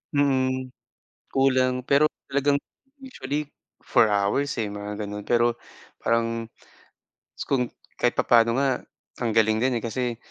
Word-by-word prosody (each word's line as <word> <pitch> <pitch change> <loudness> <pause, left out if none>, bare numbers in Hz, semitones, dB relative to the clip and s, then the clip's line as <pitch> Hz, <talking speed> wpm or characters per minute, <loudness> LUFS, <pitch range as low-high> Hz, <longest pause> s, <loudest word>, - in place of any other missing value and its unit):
Mm. 130 -2 +1 0.6
Kulang 130 -1 +2
pero 145 +2 +5 0.2
talagang 140 +1 +2 0.4
usually 150 - -4 0.4
4 110 - +4
hours 105 +9 +1
eh, 110 - 0
mga 105 +1 -6
ganon. 105 0 -6
Pero 120 0 +3 0.4
parang, 115 0 0 1.1
kung 125 -3 +1 0.3
kahit 120 - +3
papaano 115 0 +4
nga, 140 - +2 0.6
ang 115 - 0
galing 110 0 +3
din 125 -2 +1
kasi 120 +1 -2
125 Hz, 115 wpm, -25 LUFS, 115-135 Hz, 1.1 s, pero